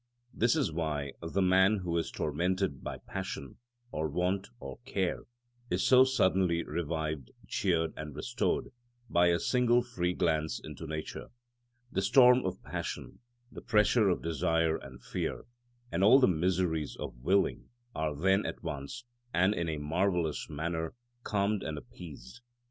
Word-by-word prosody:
This 115 Hz, +4 st, +2 dB
is 140 Hz, -, +1 dB
why 75 Hz, -4 st, -2 dB
the 85 Hz, +4 st, 0 dB
man 95 Hz, +3 st, +5 dB
who 85 Hz, -1 st, -2 dB
is 85 Hz, -, 0 dB
tormented 85 Hz, 0 st, -1 dB
by -, -, -4 dB
passion, 70 Hz, -2 st, -5 dB, 0.3 s
or 80 Hz, 0 st, -2 dB
want, 90 Hz, +5 st, 0 dB
or -, -, -8 dB
care, 100 Hz, -8 st, -2 dB, 0.4 s
is 90 Hz, +1 st, 0 dB
so 130 Hz, 0 st, +8 dB
suddenly 95 Hz, -9 st, +2 dB
revived, 80 Hz, -4 st, -3 dB, 0.2 s
cheered, 80 Hz, -4 st, 0 dB
and 75 Hz, -2 st, -7 dB
restored 120 Hz, -1 st, -1 dB, 0.4 s
by 85 Hz, 0 st, +5 dB
a 85 Hz, -1 st, +4 dB
single 120 Hz, -1 st, +3 dB
free 90 Hz, -8 st, -1 dB
glance 80 Hz, -3 st, 0 dB
into 75 Hz, +2 st, -8 dB
nature: 80 Hz, 0 st, -5 dB, 0.6 s
the -, -, 0 dB
storm 125 Hz, +5 st, +6 dB
of 95 Hz, +1 st, -5 dB
passion, -, -, -5 dB, 0.3 s
the -, -, -9 dB
pressure 105 Hz, 0 st, +3 dB
of 90 Hz, -, 0 dB
desire 80 Hz, -1 st, +1 dB
and 65 Hz, -4 st, -10 dB
fear, -, -, -3 dB, 0.5 s
and 85 Hz, +3 st, +1 dB
all 115 Hz, +6 st, +8 dB
the 130 Hz, -, +5 dB
miseries 85 Hz, -3 st, 0 dB
of -, -, -6 dB
willing 95 Hz, +10 st, +1 dB, 0.2 s
are 75 Hz, -1 st, -2 dB
then 95 Hz, +6 st, +3 dB
at -, -, -5 dB
once, 80 Hz, -, -5 dB, 0.3 s
and 95 Hz, +3 st, +4 dB
in 85 Hz, -4 st, -2 dB
a 80 Hz, -, -2 dB
marvellous 85 Hz, +2 st, 0 dB
manner, 80 Hz, +3 st, -3 dB, 0.3 s
calmed 105 Hz, -2 st, 0 dB
and 80 Hz, -1 st, -4 dB
appeased. 75 Hz, -, -11 dB
85 Hz, 150 wpm, -31 LUFS, 80-100 Hz, 0.6 s, so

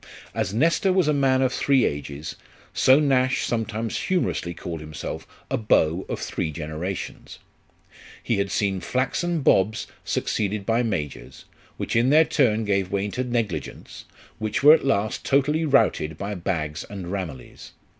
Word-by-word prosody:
As -, -, -1 dB
Nestor 165 Hz, -, +2 dB
was 185 Hz, -4 st, +2 dB
a 150 Hz, -, +3 dB
man 135 Hz, -2 st, +3 dB
of 130 Hz, -1 st, +1 dB
three 135 Hz, 0 st, +3 dB
ages, 75 Hz, +1 st, -4 dB, 0.4 s
so 130 Hz, +2 st, +5 dB
Nash 135 Hz, -3 st, +2 dB
sometimes 115 Hz, -1 st, -2 dB
humorously 180 Hz, -, -1 dB
called 85 Hz, 0 st, -6 dB
himself 75 Hz, -1 st, -7 dB, 0.2 s
a 135 Hz, -, +1 dB
beau 95 Hz, -6 st, +2 dB
of -, -, -3 dB
three -, -, -3 dB
generations. 80 Hz, +4 st, -6 dB, 0.9 s
He 115 Hz, -, 0 dB
had 100 Hz, 0 st, 0 dB
seen 95 Hz, -1 st, 0 dB
flaxen 140 Hz, -, -1 dB
bobs 110 Hz, -3 st, +2 dB, 0.2 s
succeeded 105 Hz, -1 st, -1 dB
by 115 Hz, +2 st, +2 dB
majors, 90 Hz, -, -4 dB, 0.3 s
which -, -, -3 dB
in 120 Hz, +3 st, +4 dB
their 155 Hz, +3 st, +6 dB
turn 120 Hz, -8 st, +2 dB
gave 100 Hz, -2 st, 0 dB
way 100 Hz, +1 st, -1 dB
to 125 Hz, +5 st, -2 dB
negligents, 115 Hz, -, -4 dB, 0.3 s
which 110 Hz, +3 st, -2 dB
were 150 Hz, +2 st, +10 dB
at 160 Hz, -, +3 dB
last 110 Hz, -5 st, 0 dB
totally 150 Hz, +4 st, +2 dB
routed 105 Hz, -, +2 dB
by 100 Hz, +2 st, -4 dB
bags 85 Hz, -4 st, -3 dB
and 95 Hz, -3 st, -6 dB
ramilies. 85 Hz, -10 st, -7 dB
110 Hz, 150 wpm, -24 LUFS, 90-135 Hz, 0.9 s, were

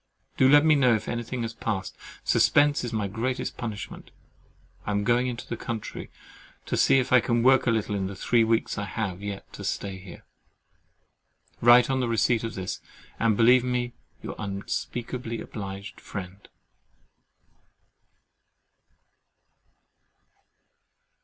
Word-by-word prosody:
Do 130 Hz, -, +5 dB
let 145 Hz, +2 st, +6 dB
me 155 Hz, -, +6 dB
know 130 Hz, -5 st, +4 dB
if 110 Hz, 0 st, -4 dB
anything 120 Hz, +1 st, -3 dB
has 115 Hz, 0 st, -4 dB
passed: 105 Hz, -4 st, -3 dB, 0.3 s
suspense 145 Hz, -1 st, +3 dB
is 120 Hz, -, -3 dB
my 110 Hz, -3 st, -1 dB
greatest 120 Hz, +6 st, -3 dB
punishment. 110 Hz, -4 st, -6 dB, 0.7 s
I -, -, -5 dB
am 100 Hz, 0 st, 0 dB
going 120 Hz, +3 st, +2 dB
into 120 Hz, -1 st, -5 dB
the -, -, -3 dB
country 115 Hz, -1 st, -6 dB, 0.6 s
to -, -, -2 dB
see -, -, +4 dB
if 130 Hz, -1 st, 0 dB
I 130 Hz, -, +8 dB
can 120 Hz, +1 st, 0 dB
work 130 Hz, +1 st, +5 dB
a -, -, +5 dB
little 110 Hz, -2 st, 0 dB
in 95 Hz, -2 st, -1 dB
the 100 Hz, -, -7 dB
three 115 Hz, +4 st, +2 dB
weeks 115 Hz, -2 st, 0 dB
I 100 Hz, -, -2 dB
have 100 Hz, -1 st, -4 dB
yet 100 Hz, -1 st, -7 dB
to -, -, -8 dB
stay 95 Hz, -2 st, -3 dB
here. 95 Hz, -1 st, -12 dB, 1.4 s
Write 120 Hz, +2 st, +6 dB
on 130 Hz, -, +1 dB
the 125 Hz, -, 0 dB
receipt 115 Hz, 0 st, +2 dB
of 115 Hz, -, -4 dB
this, 95 Hz, -1 st, -4 dB, 0.4 s
and 110 Hz, -3 st, +2 dB
believe 125 Hz, +2 st, +6 dB
me 125 Hz, -1 st, -1 dB, 0.3 s
ever -, -, -9 dB
your -, -, -5 dB
unspeakably 115 Hz, +4 st, -4 dB
obliged 100 Hz, -1 st, -7 dB
friend. 95 Hz, 0 st, -8 dB
115 Hz, 145 wpm, -26 LUFS, 100-125 Hz, 1.4 s, I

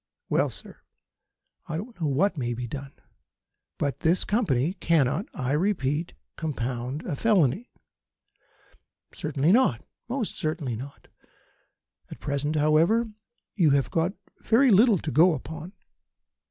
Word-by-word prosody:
Well, -, -, +2 dB
sir, -, -, -12 dB, 0.9 s
I 160 Hz, -2 st, -3 dB
don't 210 Hz, +1 st, -8 dB
know 155 Hz, -, +1 dB
what 170 Hz, +9 st, +2 dB
may 120 Hz, -4 st, -2 dB
be 125 Hz, +1 st, -4 dB
done; 135 Hz, +3 st, -7 dB, 0.9 s
but 140 Hz, -4 st, -2 dB
this 170 Hz, +3 st, +2 dB
Company 175 Hz, -, +1 dB
cannot, 165 Hz, -, +1 dB
I 130 Hz, -2 st, -3 dB
repeat, 155 Hz, -2 st, 0 dB, 0.2 s
compound 130 Hz, -2 st, -3 dB
a -, -, -2 dB
felony." 200 Hz, -, +2 dB, 1.4 s
"Certainly 150 Hz, +2 st, 0 dB
not. 205 Hz, -, +3 dB, 0.2 s
Most 245 Hz, -3 st, -2 dB
certainly 155 Hz, -6 st, -2 dB
not. 135 Hz, +5 st, -10 dB, 1.0 s
At -, -, -10 dB
present, 145 Hz, +2 st, -2 dB
however, 165 Hz, +10 st, +3 dB, 0.4 s
you 170 Hz, -7 st, +3 dB
have 135 Hz, -3 st, -2 dB
got 170 Hz, +3 st, +1 dB, 0.3 s
very 245 Hz, +3 st, +4 dB
little 210 Hz, +1 st, +6 dB
to 155 Hz, -, -4 dB
go 160 Hz, +5 st, +5 dB
upon. 160 Hz, +6 st, -8 dB
155 Hz, 125 wpm, -26 LUFS, 140-190 Hz, 1.4 s, little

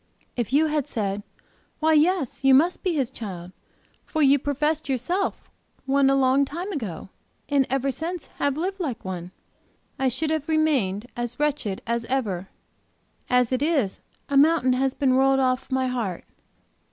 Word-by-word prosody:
If 240 Hz, -2 st, -2 dB
you 295 Hz, +4 st, +4 dB
had 300 Hz, -3 st, -1 dB
said, 200 Hz, -2 st, -2 dB, 0.6 s
'Why, 315 Hz, 0 st, +3 dB
yes, 310 Hz, -4 st, +2 dB
you 270 Hz, -1 st, +6 dB
must 335 Hz, +7 st, +3 dB
be 360 Hz, -3 st, 0 dB
His 265 Hz, -5 st, 0 dB
child, 185 Hz, -5 st, -7 dB, 0.5 s
for 315 Hz, -2 st, -1 dB
you 280 Hz, 0 st, +5 dB
professed 295 Hz, +2 st, -1 dB
yourself 275 Hz, -, -1 dB, 0.4 s
one 275 Hz, 0 st, +3 dB
a 275 Hz, -, +4 dB
long 270 Hz, +1 st, +3 dB
time 340 Hz, +8 st, -4 dB
ago, 205 Hz, -, -5 dB, 0.4 s
and 280 Hz, -2 st, +2 dB
ever 270 Hz, +1 st, 0 dB
since 335 Hz, +4 st, -5 dB, 0.2 s
have 285 Hz, 0 st, +1 dB
lived 380 Hz, +4 st, -2 dB
like 265 Hz, -, -4 dB
one,' 180 Hz, -2 st, -5 dB, 0.7 s
I 265 Hz, -1 st, +2 dB
should 295 Hz, +6 st, -1 dB
have 315 Hz, -1 st, -2 dB
remained 270 Hz, -11 st, +1 dB
as 240 Hz, +1 st, -4 dB
wretched 280 Hz, -10 st, -1 dB
as 235 Hz, 0 st, -1 dB
ever. 205 Hz, -8 st, -2 dB, 0.8 s
As 250 Hz, -1 st, +3 dB
it 255 Hz, 0 st, 0 dB
is, 285 Hz, -, 0 dB, 0.3 s
a 280 Hz, -, +1 dB
mountain 290 Hz, -3 st, +4 dB
has 265 Hz, +1 st, 0 dB
been 265 Hz, -2 st, +2 dB
rolled 270 Hz, +1 st, +4 dB
off, 255 Hz, -1 st, 0 dB
my 260 Hz, -1 st, +1 dB
heart. 235 Hz, -8 st, -3 dB
270 Hz, 165 wpm, -24 LUFS, 240-300 Hz, 0.8 s, you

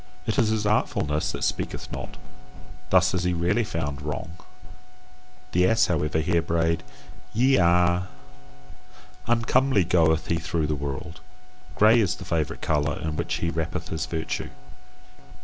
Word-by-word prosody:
It 110 Hz, -, 0 dB
is 115 Hz, -4 st, +3 dB
his 110 Hz, -1 st, 0 dB
artfulness 75 Hz, -7 st, 0 dB
that -, -, -5 dB
speaketh -, -, -3 dB
not: -, -, -7 dB, 0.7 s
thus 90 Hz, 0 st, +4 dB
is 90 Hz, -1 st, 0 dB
he 90 Hz, 0 st, +1 dB
rarely 90 Hz, +7 st, +1 dB
found 70 Hz, -8 st, -4 dB
wrong. 75 Hz, +2 st, -4 dB, 1.2 s
The 90 Hz, +1 st, +3 dB
ass, 115 Hz, +2 st, +4 dB
however, 75 Hz, -3 st, 0 dB
here 85 Hz, +1 st, +1 dB
brayed 80 Hz, 0 st, 0 dB, 0.5 s
YE 130 Hz, +4 st, +4 dB
A. 90 Hz, 0 st, +3 dB, 1.2 s
Uncomely 120 Hz, -1 st, +3 dB
goeth 80 Hz, -1 st, +2 dB
he 85 Hz, -, 0 dB
through 80 Hz, 0 st, -1 dB
the 75 Hz, -, -1 dB
world. 75 Hz, +3 st, -5 dB, 0.6 s
Grey 110 Hz, +3 st, +6 dB
is 95 Hz, -5 st, +1 dB
the 95 Hz, -, -10 dB
favourite 80 Hz, -4 st, -2 dB
colour 75 Hz, -1 st, 0 dB
in 80 Hz, -1 st, -3 dB
which -, -, -2 dB
he 85 Hz, -, -1 dB
wrappeth 80 Hz, +1 st, -3 dB
his 80 Hz, -2 st, -3 dB
virtue. 80 Hz, -1 st, -3 dB
85 Hz, 145 wpm, -25 LUFS, 80-95 Hz, 1.2 s, Grey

